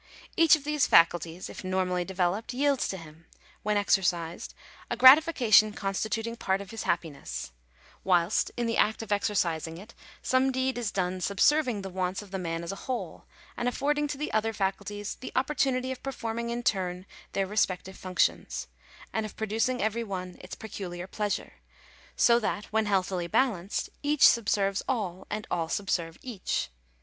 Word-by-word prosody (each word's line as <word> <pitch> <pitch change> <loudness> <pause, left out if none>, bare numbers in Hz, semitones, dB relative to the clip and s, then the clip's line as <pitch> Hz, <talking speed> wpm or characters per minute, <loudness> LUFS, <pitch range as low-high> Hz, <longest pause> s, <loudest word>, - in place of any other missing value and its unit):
Each 330 -1 +7
of 305 - -7
these 300 -1 +1
faculties, 170 +1 +3
if - - -9
normally 185 -1 0
developed, 190 +6 -1
yields 280 0 +2
to 190 - -4
him, 160 -1 -13 0.3
when 210 0 +1
exercised, 175 -4 0 0.3
a - - -2
gratification 260 -7 +7
consti 195 +2 -2
tuting 230 +1 -3
part 190 0 +1
of 200 -1 -9
his 225 - -5
happiness; 160 - -3 0.5
whilst, 180 +1 +2
in 240 - 0
the 230 0 0
act 220 +1 +2
of 220 - -10
exercising 175 -6 0
it, 210 +6 -12 0.3
some 260 +1 +2
deed 260 -1 -1
is 230 -4 -1
done 185 -1 -1
subserving 225 - +2
the 195 - -5
wants 185 +2 -2
of 200 - -16
the 190 - -3
man 165 -1 -3
as 170 - -4
a - - -5
whole, 255 - -4 0.3
and 240 - -2
affording 295 +3 0
to 285 - -4
the 300 - -4
other 220 +1 +1
faculties 205 +1 -3
the - - -8
opportunity 260 -2 +1
of 260 - -6
perform 235 -4 -4
ing 235 0 -3
in 240 +1 -3
turn 185 -4 -1 0.3
their 195 - +1
respective 190 -2 -1
functions, 185 -1 -1 0.5
and 220 - 0
of 215 - -8
producing 225 +3 0
every 220 +2 0
one 185 -4 -5
its - - -8
peculiar 180 -5 -6
pleasure: 205 +1 -3 0.5
so 235 0 +5
that, 210 -2 -2
when 220 -1 +2
healthily 185 -3 0
balanced, 200 -3 0
each 295 0 +6
subserves 200 -3 +2
all, 190 -8 -2
and 210 0 -3
all 165 -2 -1
subserve 170 -5 -1
each. 225 - -2
205 Hz, 170 wpm, -28 LUFS, 185-240 Hz, 0.5 s, Each